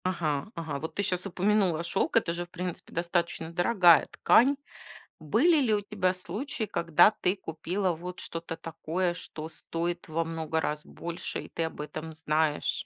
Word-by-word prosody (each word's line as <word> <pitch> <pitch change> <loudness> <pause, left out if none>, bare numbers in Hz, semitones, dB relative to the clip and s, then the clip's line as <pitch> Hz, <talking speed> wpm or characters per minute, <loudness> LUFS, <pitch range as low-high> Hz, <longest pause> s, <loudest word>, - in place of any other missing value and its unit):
Ага 155 -6 0
ага, 160 -4 -4
вот 160 - -5
ты 200 - 0
щас 180 -1 -1
упомянула, 190 -3 +2
шёлк- 185 +6 +1
это 175 -7 +2
же, 175 +1 -3
в - - -26
принципе, 180 -1 -6
достаточно 170 -1 -1
дорогая 175 -2 +5
ткань. 275 +5 +5 0.6
Были 275 - +4
ли 235 -5 +2
у 210 - +3
тебя 195 -3 0
случаи, 215 +7 -4
когда 170 -1 +4
ты 185 -3 0
купила 180 +2 -2
вот 180 +2 -7
что-то 165 0 -6
такое, 165 +2 -2
что 160 -2 -7
стоит 170 +1 -4
во 165 +1 0
много 160 -1 -2
раз 150 -1 -2
больше, 170 0 -5
и - - -11
ты 165 - -2
об 160 - -5
этом 155 +2 -6
знаешь? 155 -1 0
170 Hz, 170 wpm, -29 LUFS, 160-185 Hz, 0.6 s, дорогая